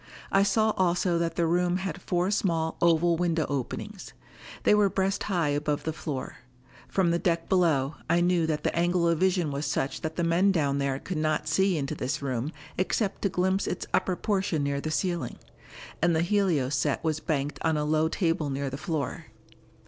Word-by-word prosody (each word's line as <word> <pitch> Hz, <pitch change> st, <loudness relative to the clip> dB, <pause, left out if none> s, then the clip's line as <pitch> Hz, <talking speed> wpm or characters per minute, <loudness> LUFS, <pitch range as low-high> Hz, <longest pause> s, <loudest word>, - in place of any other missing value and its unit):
I 195 Hz, -, +4 dB
saw 215 Hz, +2 st, +3 dB
also 175 Hz, -1 st, +2 dB
that 170 Hz, 0 st, -1 dB
the 170 Hz, -, +1 dB
room 175 Hz, +2 st, +2 dB
had 190 Hz, -4 st, -4 dB
four 180 Hz, +1 st, 0 dB
small 165 Hz, -6 st, 0 dB
oval 170 Hz, 0 st, +3 dB
window 165 Hz, -2 st, +1 dB
openings. 140 Hz, -4 st, -5 dB, 0.5 s
They -, -, +5 dB
were 210 Hz, -1 st, +4 dB
breast 195 Hz, +1 st, 0 dB
high 175 Hz, -7 st, 0 dB
above 145 Hz, 0 st, -1 dB
the 160 Hz, -, -2 dB
floor; 150 Hz, -4 st, -5 dB, 0.5 s
from 185 Hz, -3 st, +1 dB
the 170 Hz, -, +1 dB
deck 170 Hz, -2 st, 0 dB
below 155 Hz, -6 st, +2 dB
I 170 Hz, +1 st, +4 dB
knew 175 Hz, -2 st, +2 dB
that 155 Hz, -2 st, -1 dB
the -, -, 0 dB
angle 175 Hz, 0 st, +2 dB
of 165 Hz, -2 st, +2 dB
vision 180 Hz, -4 st, +2 dB
was 140 Hz, +1 st, -3 dB
such 135 Hz, -, -2 dB
that 160 Hz, 0 st, -4 dB
the 170 Hz, -, -1 dB
men 175 Hz, +4 st, +3 dB
down 140 Hz, -6 st, +1 dB
there 140 Hz, -1 st, 0 dB
could 170 Hz, +3 st, -4 dB
not 155 Hz, 0 st, 0 dB
see 185 Hz, +3 st, +2 dB
into 140 Hz, 0 st, -2 dB
this 145 Hz, +1 st, -2 dB
room 130 Hz, 0 st, -2 dB, 0.3 s
except 195 Hz, +2 st, 0 dB
to 200 Hz, -, +1 dB
glimpse 190 Hz, +2 st, 0 dB
its 180 Hz, -, -3 dB
upper 185 Hz, -1 st, +1 dB
portion 190 Hz, -7 st, 0 dB
near 140 Hz, 0 st, -1 dB
the 155 Hz, -, -3 dB
ceiling. 175 Hz, +1 st, -2 dB, 0.6 s
And 170 Hz, 0 st, +3 dB
the 160 Hz, -, +2 dB
helio 175 Hz, -8 st, +1 dB
set 140 Hz, +1 st, 0 dB
was 155 Hz, -1 st, 0 dB
banked 145 Hz, -2 st, -2 dB
on 160 Hz, -1 st, +1 dB
a 150 Hz, -, 0 dB
low 155 Hz, +1 st, +2 dB
table 165 Hz, -5 st, 0 dB
near 135 Hz, 0 st, -2 dB
the 135 Hz, -, -5 dB
floor. 155 Hz, -7 st, -3 dB
165 Hz, 195 wpm, -27 LUFS, 150-180 Hz, 0.6 s, They